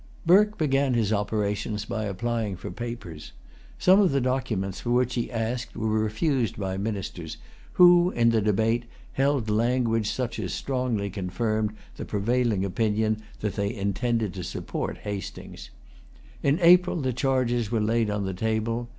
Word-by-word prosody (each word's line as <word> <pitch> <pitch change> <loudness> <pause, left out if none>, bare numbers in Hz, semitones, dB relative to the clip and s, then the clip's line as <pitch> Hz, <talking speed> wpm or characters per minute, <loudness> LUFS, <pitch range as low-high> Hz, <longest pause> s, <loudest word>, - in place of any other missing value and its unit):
Burke 210 +5 +5
began 135 -4 +1
his 110 -2 +1
operations 105 0 -1
by 110 0 -3
applying 110 +1 -2
for 90 - -7
Papers. 100 -10 -7 0.4
Some 185 +2 +5
of 190 - +3
the 140 - +2
documents 120 -7 -1
for 120 - -4
which 125 0 +2
he 120 - -2
asked 120 +1 -3
were 110 - -1
refused 110 +4 0
by 95 -2 -3
the 95 - -4
ministers, 95 -6 -4 0.4
who, 175 0 +7
in 115 -7 +2
the 115 -1 +2
debate, 110 +3 +1 0.3
held 135 -3 +1
language 115 0 +1
such 125 -3 -3
as 90 -5 -3
strongly 125 -7 -2
confirmed 105 +3 -2 0.2
the - - -5
prevailing 110 -1 0
opinion 110 +2 0 0.2
that 105 -2 -1
they 100 -1 -1
intended 105 +1 -1
to 90 - -6
support - - -4
Hastings. 100 -2 -7 0.7
In 140 +2 +2
April 180 +2 +6
the 130 -3 -1
charges 120 -3 0
were 115 -1 0
laid 110 +1 +1
on 105 -1 -2
the 95 - -3
table. 110 +4 -2
115 Hz, 155 wpm, -26 LUFS, 105-125 Hz, 0.7 s, who